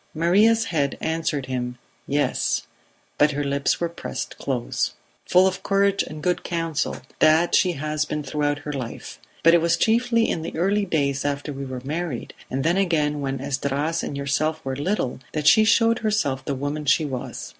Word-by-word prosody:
Maria's 205 +8 +4
head 140 -3 0
answered 160 -4 -1
him 125 -1 -3 0.3
"Yes," 145 +1 0 0.6
but 150 0 +4
her 145 +1 -1
lips 140 0 0
were 170 - 0
pressed 170 - -6
close. 125 -3 -1 0.3
"Full 180 +1 +5
of 185 -1 0
courage 200 0 +2
and 155 -1 -7
good 180 0 0
counsel, 165 -3 -2 0.2
that 160 +2 +4
she 180 -2 +4
has 155 +1 -1
been 150 0 -3
throughout 145 +1 -1
her 150 - -3
life; 130 -4 -6 0.2
but 165 - +7
it 170 - +5
was 170 0 +2
chiefly 230 0 +2
in 165 - -1
the 160 - -6
early 200 +4 +2
days 140 -6 0
after 145 +1 -2
we 135 0 -5
were 130 -1 -6
married, 155 -2 -4 0.2
and 135 +1 -2
then 170 +4 +2
again 150 -6 +1
when 135 -1 -2
Esdras 140 +4 -1
and 140 - -4
yourself 155 +3 0
were 135 0 -2
little, 145 -3 -1
that 150 -1 -2
she 220 +8 +7
showed 230 +1 +4
herself 210 -12 0
the 140 - -2
woman 145 +3 -3
she 145 +3 +3
was. 130 -4 -5
150 Hz, 180 wpm, -23 LUFS, 140-175 Hz, 0.6 s, but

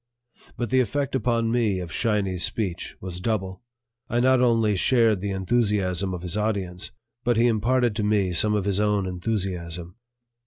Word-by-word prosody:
But 120 -1 -3
the 130 - +4
effect 135 +4 -1
upon 115 -2 +1
me 110 -6 +1
of 85 -3 -6
"Shiny's" 100 -6 0
speech 90 +1 -2
was 90 -1 -6
double; 95 -2 -2 0.5
I 120 - +1
not 130 0 +4
only 115 -4 +3
shared 110 -1 +3
the 100 - -2
enthusiasm 95 -2 0
of 90 - -8
his 90 +1 -1
audience, 100 -4 -2 0.3
but 120 -1 +1
he 115 - +4
imparted 120 0 +2
to 110 - 0
me 105 -3 +1
some 105 +5 +3
of 100 -2 -1
his 100 -1 +1
own 105 -2 +1
enthusiasm. 90 -2 -3
105 Hz, 165 wpm, -25 LUFS, 95-115 Hz, 0.5 s, the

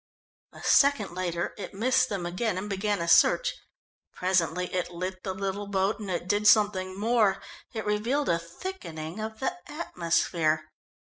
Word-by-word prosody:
A - - -13
second 275 -10 +4
later 175 -1 -2
it 200 - -7
missed 255 +4 +2
them 195 -4 -3
and 185 +2 -2
began 205 -1 -1
a - - -4
search. - - +5 0.6
Presently 180 -1 0
it 180 -1 -1
lit 185 +2 -5
the 190 -1 -3
little 195 +1 -3
boat, 195 +2 0
and 205 -3 -6
it 175 -1 -2
did 205 +2 +2
something 195 -3 +3
more 215 -3 +3 0.3
it 220 -2 -5
revealed 230 +8 0
a 170 - +2
thickening 170 - -7
of 220 0 -5
the 355 +7 -1 0.2
atmosphere. 165 - 0
195 Hz, 150 wpm, -28 LUFS, 180-220 Hz, 0.6 s, search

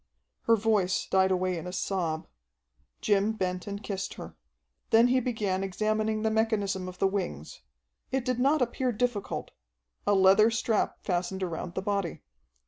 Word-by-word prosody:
Her 230 - +6
voice 205 -4 +1
died 190 0 +3
away 185 -1 0
in 165 - -7
a - - -4
sob. 175 -4 -2 0.7
Jim 205 +1 +2
bent 185 -3 -3
and 200 +1 -5
kissed 195 -2 -4
her. - - -9 0.5
Then 230 +2 +6
he 255 +1 +4
began 210 -6 -1
examining 215 +3 0
the 220 - +2
mechanism 205 -4 0
of 180 0 -8
the - - +1
wings. 80 - -3 0.5
It 265 -2 -1
did 250 -2 0
not 275 +2 +3
appear 250 +1 -1
difficult. 235 -2 -2 0.6
A 205 - +4
leather 195 +3 +6
strap 225 -1 0
fastened 185 +1 -1
around 175 0 -4
the 190 - -2
body. 200 -4 -2
200 Hz, 155 wpm, -28 LUFS, 185-220 Hz, 0.7 s, Her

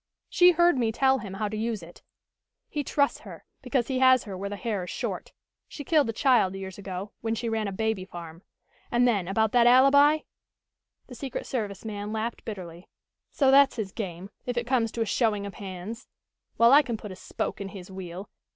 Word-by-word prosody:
She 355 0 +6
heard 345 -4 +4
me 230 -2 +1
tell 265 +3 +2
him 195 -4 -7
how 210 +2 -2
to 210 - -5
use 220 -3 -2
it. 170 +1 -14 0.7
He 295 -2 -3
trusts 285 0 +1
her, - - -12 0.2
because 250 -2 0
he 260 -2 -1
has 260 -1 +5
her 200 -3 -7
where 195 +2 -4
the 205 - -4
hair 200 -2 -3
is - - -9
short. - - -4 0.4
She 290 - -8
killed 295 -4 +2
a - - +1
child 225 -6 +3
years 190 0 -7
ago, 195 0 -6
when 225 0 -1
she 235 +1 -3
ran 220 -2 -1
a - - -3
baby 220 -1 -1
farm. 170 -2 -10 0.5
And 240 +1 +3
then 200 -7 +1
about 220 +2 +1
that 240 -1 +5
alibi 280 +4 +6 0.4
" - - -58
The 255 - -11
secret 265 +1 -5
service 210 -5 -4
man 205 -1 -5
laughed 220 +2 -3
bitterly. 180 -5 -8 0.4
"So 270 -2 +3
that's 275 0 +6
his 215 -5 -4
game, 190 -1 -6 0.2
if 245 -1 -2
it 240 - 0
comes 235 -3 +1
to 230 - -3
a - - +2
showing 210 -2 0
of 200 - -7
hands? 200 +4 -8 0.5
Well, 235 +2 +6
I 290 - +9
can 240 -6 -4
put 210 -2 -9
a - - -7
spoke 190 - -5
in 200 - -4
his 190 -2 -10
wheel. 185 +1 -7
220 Hz, 215 wpm, -27 LUFS, 195-255 Hz, 0.7 s, I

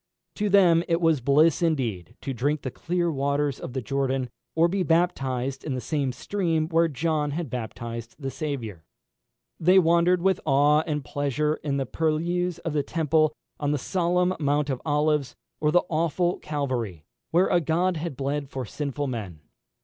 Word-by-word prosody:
To 210 -1 -1
them 175 -4 +5
it 170 -1 +2
was 165 -5 +2
bliss 150 +6 +4
indeed 120 - -1
to 135 - -3
drink 145 +5 -1
the 130 - -3
clear 175 +3 -1
waters 140 0 0
of 125 - -7
the 130 -2 -3
Jordan, 135 0 -1 0.2
or 165 +1 +5
be 190 +2 -1
baptised 135 -7 0
in 140 -4 -3
the - - -2
same 140 -1 -1
stream 165 - -1
where 165 0 +3
John 155 0 -1
had 150 -2 -4
baptised 115 -1 -6
the 135 -2 -4
Saviour. 120 - -5 0.8
They 180 +4 +5
wandered 170 0 +4
with 190 -1 +3
awe 145 +1 +4
and 150 -3 -2
pleasure 145 +3 -1
in 140 -2 -2
the 135 - -1
purlieus 165 +5 -1
of 165 - -1
the 150 - +2
Temple, 155 0 +1 0.2
on 145 - -1
the - - +1
solemn 180 +4 +1
Mount 145 -1 +1
of 130 - -3
Olives, 150 -3 +1 0.2
or 150 - +2
the 175 - +4
awful 170 +2 0
Calvary, 125 - -3 0.2
where 175 +3 +4
a 175 - +3
God 170 +3 +1
had 155 -4 -5
bled 140 0 -2
for 130 -3 -4
sinful 145 +4 -3
men. 105 - -5
150 Hz, 170 wpm, -26 LUFS, 135-165 Hz, 0.8 s, them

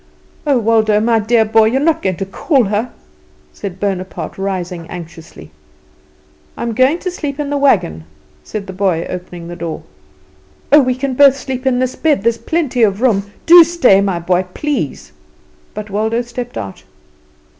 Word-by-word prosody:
"Oh, 280 -3 +3
Waldo, 220 -2 +2
my 225 +1 +2
dear 220 +1 +2
boy, 220 0 +4
you 230 +4 +1
are - - +1
not 325 +2 +1
going 190 -2 -1
to 195 - -3
call 260 - +1
her," 215 +4 -2 0.6
said 190 -2 -7
Bonaparte, 185 -4 -4
rising 180 -3 -4
anxiously. 165 - -10 1.1
"I - - -4
am 235 -1 -2
going 260 +7 +3
to 365 - -3
sleep 290 -5 -5
in 290 -1 -3
the 290 - 0
wagon," 180 - +1 0.4
said 210 -2 -6
the 190 - -8
boy, 185 -3 0
opening 180 -1 -7
the 175 - -7
door. 170 -2 -5 0.9
"Oh, 295 +1 +8
we 255 -1 0
can 265 +1 -3
both 275 +1 +5
sleep 265 -1 -4
in 255 -1 +2
this 255 0 -1
bed; 295 -10 +1
there's 230 0 +1
plenty 300 -7 -1
of 200 -3 +3
room. 205 -5 +1
Do 340 +1 +9
stay, 315 - +3
my 195 -3 0
boy, 180 +2 0
please." 295 -1 -3 0.6
But 210 -1 -7
Waldo 220 +4 0
stepped 240 0 -7
out. 100 -3 -6
220 Hz, 175 wpm, -16 LUFS, 190-260 Hz, 1.1 s, Do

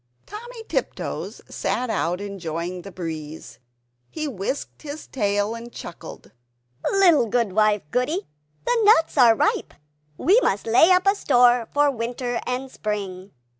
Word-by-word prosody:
Timmy 465 +2 -9
Tiptoes - - -3
sat 250 -2 -2
out, 175 0 -1
enjoying 180 -3 -5
the 195 - -10
breeze; 160 -3 -7 0.5
he 310 -1 -4
whisked 250 +2 -4
his 300 0 -7
tail 205 -2 0
and 230 +1 -8
chuckled 175 - -10 0.6
"Little 350 -10 +5
wife 215 -2 +2
Goody, 305 +11 0 0.4
the - - +2
nuts 410 -6 +5
are 235 -3 +7
ripe; - - 0 0.4
we 400 +8 +4
must 200 - 0
lay 235 +9 +5
up 365 0 +4
a 395 - +5
store 245 - +3
for 290 0 +3
winter 245 0 -3
and 255 +1 -3
spring." 195 -4 -4
235 Hz, 130 wpm, -23 LUFS, 200-295 Hz, 0.6 s, are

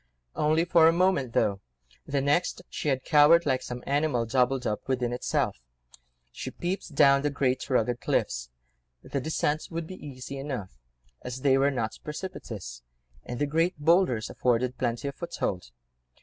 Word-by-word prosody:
Only 155 +2 +2
for 170 -2 +6
a - - +6
moment, 170 -8 +1
though; 100 -2 +1 0.5
the 140 -1 0
next 175 +6 +1
she 150 - -2
had 130 -2 0
cowered, 160 +2 +6
like 130 -3 +1
some 125 0 -7
animal 140 -4 +1
doubled 125 +2 +1
up 105 - -3
within 125 -2 0
itself. 125 - -1 0.7
She - - -6
peeped 175 -3 -4
down 140 0 +6
the 145 - +1
great 135 -1 -1
rugged 120 -1 +1
cliffs—the - - -4
descent 155 +1 -1
would 165 -1 -4
be 185 +3 -10
easy 135 0 -7
enough, 120 - -6 0.4
as 125 +1 -6
they 135 -1 +4
were 135 +1 +3
not 115 -5 -3
precipitous, 110 - -7 0.4
and 120 - -5
the 145 - +1
great 165 +4 +1
boulders 150 -7 +3
afforded 125 0 0
plenty 120 +2 -1
of 140 - -3
foothold. 95 - -4
135 Hz, 155 wpm, -27 LUFS, 120-150 Hz, 0.7 s, for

